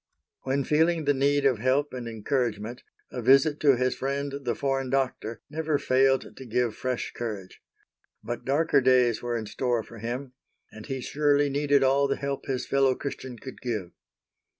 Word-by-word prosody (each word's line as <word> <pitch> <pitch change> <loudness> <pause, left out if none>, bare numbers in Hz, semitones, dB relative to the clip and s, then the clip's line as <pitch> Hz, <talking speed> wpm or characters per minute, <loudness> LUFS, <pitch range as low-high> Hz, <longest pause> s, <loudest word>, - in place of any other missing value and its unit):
When 135 +1 0
feeling 160 +2 +2
the 145 - +4
need 140 +1 +2
of 130 -5 +3
help 130 +4 +1
and 125 -2 -5
encouragement, 115 0 -2 0.3
a 125 - -4
visit 135 +5 +4
to 140 -3 +5
his 130 +1 +1
friend 140 +1 -3
the 120 -2 0
foreign 135 0 -1
doctor, 130 -4 -1
never 155 0 -1
failed 135 -1 +2
to - - -8
give 120 0 0
fresh 130 -1 -3
courage. 105 -6 -6 0.6
But 120 0 -5
darker 140 +1 +2
days 125 -3 +3
were 120 -1 -2
in 110 - -4
store 120 +1 -1
for 115 0 -12
him, 125 +4 -5 0.4
and 110 - -11
he 135 -1 -3
surely 145 +1 +2
needed 145 0 +2
all 135 +1 +3
the 140 - 0
help 140 0 -4
his 130 -2 -2
fellow 135 -1 +2
Christian 130 -3 -6
could 130 +3 -10
give. 110 -8 -3
130 Hz, 175 wpm, -27 LUFS, 120-140 Hz, 0.6 s, to